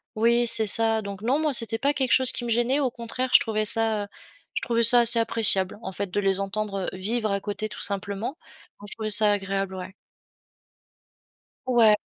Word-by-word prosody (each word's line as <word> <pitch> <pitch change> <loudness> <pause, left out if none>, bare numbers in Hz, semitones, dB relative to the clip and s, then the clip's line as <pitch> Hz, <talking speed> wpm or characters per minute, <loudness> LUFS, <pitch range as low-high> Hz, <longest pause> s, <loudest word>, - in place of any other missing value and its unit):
oui, 235 +2 +1
c'est 220 -1 +4
ça. 225 +1 +2
Donc, 200 -1 -9
non, 265 +6 0
moi, 310 -1 -1
c'était 230 -3 +2
pas 280 +3 0
quelque 265 -3 -1
chose 260 -1 +6
qui 240 - -6
me - - -5
gênait, 240 +4 0
au 270 -3 -1
contraire, 245 +2 -6
je - - +7
trouvais 215 -2 -3
ça, 220 -1 0
heu, - - -10 0.5
je - - -4
trouvais 235 -1 -1
ça 240 +1 +8
assez 235 0 +6
appréciable, 210 -4 0
en 190 - -7
fait, 195 +1 -5
de 205 +3 -3
les 195 -1 0
entendre, 195 -1 -4
heu, - - -9
vivre 215 +3 -3
à 200 0 -3
côté 210 +1 -5
tout 210 - -9
simplement. 200 - -4 0.4
Non, 205 - -13
je - - -3
trouvais 215 -1 -5
ça 210 0 +5
agréable, 195 -1 -4
ouais. 185 +1 -9 1.7
Ouais, 230 -4 +3
220 Hz, 210 wpm, -23 LUFS, 200-235 Hz, 1.7 s, ça